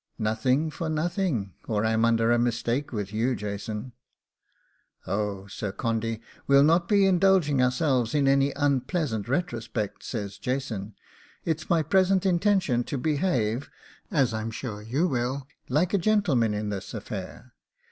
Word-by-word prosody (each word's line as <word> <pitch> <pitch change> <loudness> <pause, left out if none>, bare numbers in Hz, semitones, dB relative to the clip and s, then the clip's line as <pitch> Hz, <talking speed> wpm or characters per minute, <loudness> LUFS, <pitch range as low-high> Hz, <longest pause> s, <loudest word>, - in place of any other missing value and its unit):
'Nothing 125 +8 +1
for 160 +2 -4
nothing, 155 - -1
or 105 -1 0
I'm 110 +1 +2
under 115 0 +3
a 120 - +4
mistake 120 +4 0
with 105 -3 -4
you, 120 +4 +1
Jason.' 105 +3 -5 1.1
'Oh, 100 -1 -2
Sir 100 0 -5
Condy, 115 +1 -2 0.3
we'll 140 0 +6
not 170 +3 +3
be 200 -2 +5
indulging 185 -7 +4
ourselves 125 -1 +1
in 140 -2 +3
any 135 +1 +4
unpleasant 140 - 0
retrospects,' 120 - -2
says 100 -4 -5
Jason; 115 -6 -3 0.5
'it's 160 -1 -2
my 165 -3 +3
present 190 +3 +3
intention 175 - +2
to 140 - -3
behave, 135 - 0 0.4
as 135 - +2
I'm 110 0 -2
sure 110 -2 -6
you 130 +11 0
will, 130 -1 -2 0.2
like 160 +8 +1
a 200 - +3
gentleman 165 - +2
in 105 0 -2
this 95 -2 -5
affair. - - -7
125 Hz, 140 wpm, -26 LUFS, 110-155 Hz, 1.1 s, we'll